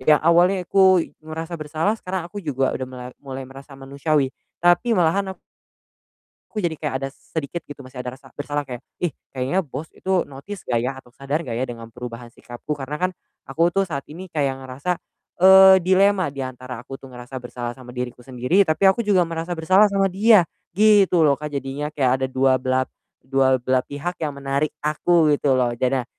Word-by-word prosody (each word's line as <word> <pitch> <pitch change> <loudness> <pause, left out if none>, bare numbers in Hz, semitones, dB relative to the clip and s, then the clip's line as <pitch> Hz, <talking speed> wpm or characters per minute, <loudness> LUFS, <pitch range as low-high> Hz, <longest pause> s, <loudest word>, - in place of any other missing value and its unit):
Yang 150 +3 +4
awalnya 175 +3 +4
aku 185 -2 +4
ngerasa 160 +2 -6
bersalah 155 +7 0
sekarang 185 -3 -4
aku 205 - -7
juga 135 -6 0
udah 130 - -4
melar 125 -1 -9
mulai 135 -1 -7
merasa 135 +2 -12
manusiawi 140 +1 0 0.3
tapi 175 +7 +4
malahan 190 +3 +2 1.0
aku 215 - -9
jadi 165 -2 0
kayak 150 -3 -3
ada - - -1
sedikit, 160 +3 -6
gitu, 145 - -10
masih 130 0 -11
ada 125 - -5
rasa 135 -2 -17
bersalah 145 0 -2
kayak, 125 0 -7 0.2
"Ih, 175 - +1 0.3
kayaknya 130 +8 0
bos 150 +3 -6
itu 190 -2 +1
notice 160 +9 -9
nggak 120 -2 +1
ya 125 - 0
atau 125 - -18
sadar 140 +5 -3
nggak 115 -6 -4
ya 130 - 0
dengan 115 -1 -8
perubahan 120 0 -8
sikapku?" 125 +5 -7
Karena 140 +2 -5
kan - - -7 0.4
aku 165 +5 +2
tuh 195 - +3
saat 140 -5 -4
ini 185 +3 -9
kayak 140 -4 -1
ngerasa, 130 +6 -4 0.5
eee, 190 0 +9
dilema 190 -1 +3
diantara 130 -3 -6
aku - - -9
tuh 135 - -11
ngerasa 125 +2 -9
bersalah 120 -1 -5
sama 130 -1 -12
diriku 125 0 -5
sendiri 130 +9 +2
tapi 155 +5 +2
aku 190 +5 +1
juga 190 -4 +4
merasa 165 +1 -4
bersalah 190 +6 +5
sama 195 -1 +2
dia, 205 -1 +5 0.3
gitu 200 -6 +5
loh, 145 - +5
Kak, 150 0 -5
jadinya. 140 +2 -3
Kayak 130 -2 +1
ada 130 - +1
2 130 0 +3
belap 130 0 +1 0.4
dual 130 0 +3
belah 130 +1 +2
pihak 145 +5 -4
yang 150 -2 -2
menarik 140 +2 -1 0.2
aku, 155 +1 +3
gitu 140 -1 +1
loh. 120 -2 +1
Jadi, 130 0 0
145 Hz, 190 wpm, -22 LUFS, 130-175 Hz, 1.0 s, eee